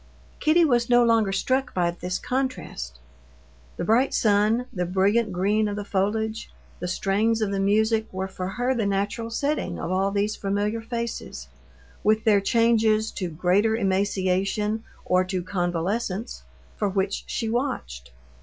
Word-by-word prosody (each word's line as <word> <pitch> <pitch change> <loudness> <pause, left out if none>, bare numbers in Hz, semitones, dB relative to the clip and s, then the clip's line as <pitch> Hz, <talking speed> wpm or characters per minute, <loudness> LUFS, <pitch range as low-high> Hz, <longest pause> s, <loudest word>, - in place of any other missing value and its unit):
Kitty 330 +2 +4
was 240 -5 +2
no 240 0 +6
longer 225 -4 +3
struck 260 +8 0
by 175 -2 +2
this 180 +1 -4
contrast. 255 - -3 0.8
The - - -2
bright 235 +8 +2
sun, 215 +3 +3
the 180 -2 -2
brilliant 200 +4 +2
green 205 +4 +1
of 205 - -3
the 205 -1 -5
foliage, 220 +3 -1 0.3
the 180 - -3
strains 210 +5 +1
of 215 -2 0
the 195 - -1
music 220 +3 +2
were 190 0 -3
for 185 -1 -5
her 245 +6 0
the 225 -5 0
natural 205 +4 -1
setting 230 - -1
of 170 - -4
all 190 +1 +1
these 205 +2 0
familiar 205 +3 -1
faces, 235 0 -5 0.5
with 215 +1 +3
their 205 -3 +4
changes 220 0 +2
to 180 -3 -4
greater 185 +7 +2
emaciation 195 +1 0 0.2
or 180 0 +3
to 185 -1 -3
convalescence, 185 +4 -2 0.4
for 205 - 0
which 195 0 -1
she 225 - -2
watched. 220 - -3
205 Hz, 150 wpm, -25 LUFS, 190-230 Hz, 0.8 s, no